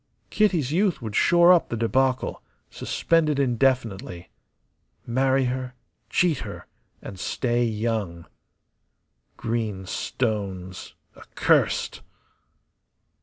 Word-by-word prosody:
Kitty's 180 - +2
youth 190 +2 +1
would 110 -4 -6
shore 175 +1 +6
up 175 - +2
the 120 - -3
debacle, 130 +3 0 0.3
suspend 165 -2 +1
it 150 - 0
indefinitely. 120 -9 0 0.8
Marry 130 +2 +2
her, 125 0 -3 0.3
cheat 170 -6 +2
her, - - -8 0.4
and 95 - -8
stay 120 +4 0
young. 110 -6 -2 1.1
Green 110 -5 -3
stones, 95 -5 -4 0.2
accursed. - - 0
125 Hz, 90 wpm, -24 LUFS, 110-135 Hz, 1.1 s, shore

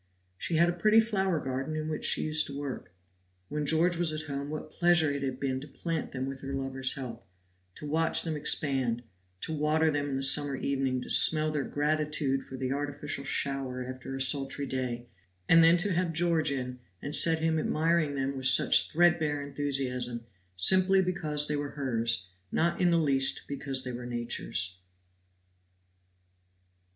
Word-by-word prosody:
She 165 - -4
had 170 +2 +4
a 175 - 0
pretty 215 +5 +3
flower 195 -6 0
garden 135 +3 -4
in 155 0 -4
which 155 -1 -4
she - - +4
used 155 0 +3
to 140 - -7
work. 140 -9 -6 0.6
When 150 0 -3
George 165 +3 +3
was 170 -2 +3
at 155 0 -2
home 140 0 -5
what 155 0 -7
pleasure 175 -3 +3
it 140 -1 -4
had 130 -2 -4
been 130 -1 -2
to 145 - -10
plant 165 +2 -5
them 130 0 -4
with 135 0 -7
her 135 0 -5
lover's 135 -1 -1
help, 120 -3 -8 0.5
to - - -10
watch 160 +2 +3
them 160 -2 -3
expand, 135 -5 +1 0.4
to 160 - -4
water 155 +1 +1
them 145 -1 -2
in 135 - -3
the 135 - -2
summer 140 +1 +3
evening, 135 -2 -2
to - - -11
smell 155 -1 +5
their 150 -2 -2
gratitude 150 -2 -1
for 130 - -10
the 130 0 -3
artificial 145 0 -4
shower 135 -2 -2
after 130 +1 -7
a - - -5
sultry 135 +1 0
day, 125 -3 -4 0.4
and 165 0 +6
then 165 +1 +6
to 195 +2 +1
have 170 -1 -1
George 165 -2 +1
in, 125 -2 -5 0.2
and 145 +7 0
set 165 -1 +5
him 160 0 0
admiring 155 -1 0
them 135 0 -2
with 130 -1 +1
such 130 - +5
threadbare 160 -3 +2
enthusiasm, 130 -4 -3 0.3
simply 185 - +5
because 155 -5 0
they 150 - -1
were 145 -1 -5
hers, 115 -7 -1 0.3
not 170 +2 0
in 180 - +3
the 170 - +3
least 135 -4 +2
because 135 -2 -4
they 125 - -5
were 120 0 -7
Nature's. 120 -6 -4
145 Hz, 180 wpm, -28 LUFS, 135-160 Hz, 0.6 s, and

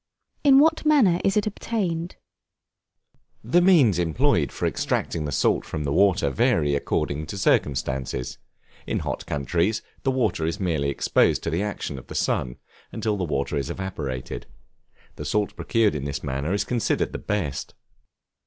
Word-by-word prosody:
In 275 -2 +7
what 320 +3 +4
manner 255 - +4
is 195 +1 +2
it 210 - +2
obtained? 185 -5 -2 1.3
The 150 +11 +3
means 150 - +5
employed 80 -4 +1
for - - -3
extracting 80 -2 -1
the 75 - -3
salt - - +2
from 80 -1 -4
the 70 -1 -1
water 90 -6 +3
vary 70 +2 +2
according 70 +1 -1
to 100 - -6
circumstances. 65 -6 0 0.5
In - - -1
hot - - -4
countries, 85 - 0 0.2
the 135 - 0
water 125 -11 0
is 85 +6 -3
merely 80 -7 0
exposed 70 - +2
to 85 - -2
the 85 +4 0
action 100 -9 -4
of - - -15
the - - -8
sun, - - -1 0.3
until 105 -1 -1
the 95 - -2
water 70 -3 -2
is 70 - -2
evaporated; 70 -10 -5 0.7
the - - -5
salt 105 +7 0
procured 115 -3 +1
in 70 -2 -4
this 70 -1 -4
manner 70 +3 -2
is 100 - +1
considered 120 -2 0
the - - -5
best. 90 -10 -3
85 Hz, 160 wpm, -24 LUFS, -, 1.3 s, In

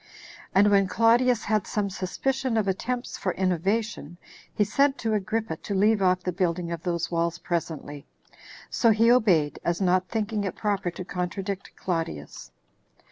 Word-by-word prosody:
And 205 +2 +5
when 195 -1 +4
Claudius 230 +2 +3
had 215 -2 0
some 200 -2 -1
suspicion 255 +7 -1
of 215 -2 +1
attempts 240 +6 -3
for 185 - -1
innovation, 190 -1 -1 0.3
he 210 - +1
sent 275 +7 +2
to 225 -2 -1
Agrippa 215 -3 -1
to 200 - -5
leave 210 +2 +3
off 185 -1 +2
the 180 - -1
building 175 -1 -1
of 170 -2 -4
those 170 -1 -2
walls 170 0 0
presently. 160 -5 -4 0.6
So 230 - +3
he 225 +2 +5
obeyed, 185 -12 +3
as 170 0 0
not 185 -1 +2
thinking 220 -2 -1
it 195 - -3
proper 200 -4 -1
to 175 +1 -7
contradict 190 +2 -4
Claudius. 165 - -4
195 Hz, 155 wpm, -26 LUFS, 175-220 Hz, 0.6 s, And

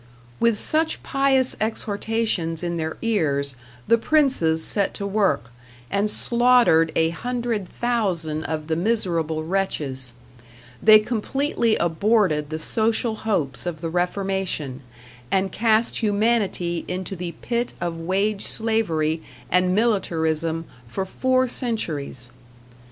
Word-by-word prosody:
With 230 -2 +3
such 320 +7 0
pious 275 -2 +2
exhortations 215 -6 -1
in 170 -1 -2
their 160 -1 -3
ears 140 - +1 0.3
the 230 - +4
princes 230 - +2
set 200 -2 0
to 200 - -3
work, 195 - 0 0.4
and 200 +2 +1
slaughtered 235 -10 +4
a 160 0 +2
hundred 235 0 -3
thousand 180 -10 -1
of 155 -1 -3
the 160 0 -1
miserable 170 -5 0
wretches; 145 -8 -2 0.7
they 215 0 +9
completely 235 +2 0
aborted 170 -3 +1
the 155 - -3
social 225 +6 0
hopes 155 - -1
of 165 -3 -4
the 165 -1 -3
Reformation, 180 -6 -1 0.5
and 190 +2 +1
cast 225 +2 +2
humanity 205 -6 0
into 185 +1 -4
the 175 -1 -5
pit 240 0 -1
of 170 -1 -3
wage 195 +4 0
slavery 165 -9 0 0.3
and 180 +1 +3
militarism 165 -7 0 0.2
for 155 +12 -3
four 255 +6 +1
centuries. 155 - -3
195 Hz, 115 wpm, -23 LUFS, 160-225 Hz, 0.7 s, they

